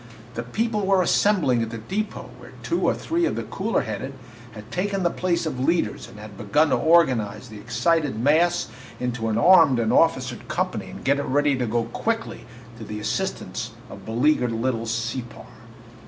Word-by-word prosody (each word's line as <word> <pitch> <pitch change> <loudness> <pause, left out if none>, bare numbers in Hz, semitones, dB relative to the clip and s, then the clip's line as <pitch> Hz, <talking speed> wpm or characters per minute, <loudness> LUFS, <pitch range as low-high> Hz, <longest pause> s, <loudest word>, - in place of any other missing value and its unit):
The 120 - -3
people 210 - -1
were 190 -1 +3
assembling 175 - +2
at 115 - -2
the 115 - -6
depot, 195 - -4
where - - -13
two - - -1
or - - +1
three 340 +1 0
of - - -1
the - - -3
cooler 210 +4 -1
headed 110 +6 -5 0.4
had 105 +1 -11
taken 195 +1 -1
the 170 - +2
place 175 -2 -1
of 140 -5 -3
leaders 135 -5 0
and - - -14
had 105 -1 -11
begun 145 +10 +2
to - - +4
organize 130 -9 +2
the 110 -1 -10
excited 140 +3 0
mass 165 +7 +3 0.3
into 125 -2 -2
an 110 - 0
armed 160 -1 +6
and 115 -2 +1
officered - - +1
company - - -2
and - - -10
get 140 +1 +3
it 140 - -2
ready 145 +1 +2
to 125 -2 -2
go 115 +1 0
quickly 225 - -3 0.3
to - - -7
the 105 0 -6
assistance 115 - -3 0.2
of - - -10
beleaguered 125 +1 +1
little 115 0 -1
Separ. 115 +2 -4
130 Hz, 185 wpm, -24 LUFS, 115-175 Hz, 0.4 s, armed